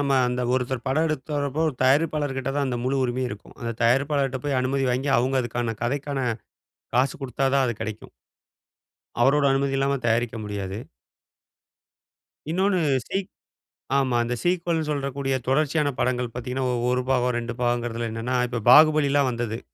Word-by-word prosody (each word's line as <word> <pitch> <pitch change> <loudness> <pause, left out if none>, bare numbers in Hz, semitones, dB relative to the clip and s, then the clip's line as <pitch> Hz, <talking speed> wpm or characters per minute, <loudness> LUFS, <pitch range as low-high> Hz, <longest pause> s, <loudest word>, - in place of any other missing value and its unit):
நம்ம 140 -2 +2
அந்த 125 0 -2
ஒருத்தர் 130 -1 -2
படம் 155 +5 +2
எடுக்கறப்போ, 145 -1 -2
ஒரு 145 - -4
தயாரிப்பாளர்கிட்ட 140 -1 +1
தான் 140 - +1
அந்த 125 -2 -2
முழு 130 +2 0
உரிமையும் 125 +1 -1
இருக்கும். 105 0 -10
அந்த 115 -1 -3
தயாரிப்பாளர்கிட்ட 135 +2 +2
போய் 140 -3 +1
அனுமதி 135 +1 0
வாங்கி, 130 +3 0
அவங்க 130 +2 +1
அதுக்கான 120 -2 -3
கதைக்கான 140 +3 -2 0.8
காசு 130 +1 +2
குடுத்தா 135 +1 -2
தான், 135 -1 +4
அது 120 - -1
கிடைக்கும். 110 0 -7 1.1
அவருடைய 140 +3 +4
அனுமதி 135 0 0
இல்லாம 140 +1 +1
தயாரிக்க 115 0 +1
முடியாது. 100 -2 -4 1.7
இன்னொன்னு 190 +3 +2 0.3
சீக் 195 0 -2 0.7
ஆமா, 130 -3 +1
அந்த 120 +1 -2
சீக்வல்ன்னு 170 -3 0
சொல்லக்கூடிய 140 -2 -1
தொடர்ச்சியான 150 +2 +1
படங்கள் 125 -1 0
பார்த்தீங்கன்னா, 125 +2 -3 0.2
1 125 0 +1
பாகம், 125 -1 +2
2 120 0 -3
பாகம்ங்கிறதில 120 -1 -1
என்னன்னா, 115 +3 -2
இப்போ 120 0 -3
பாகுபலிலாம் 145 -2 +5
வந்தது. 115 -1 -3
130 Hz, 145 wpm, -24 LUFS, 120-140 Hz, 1.7 s, பாகுபலிலாம்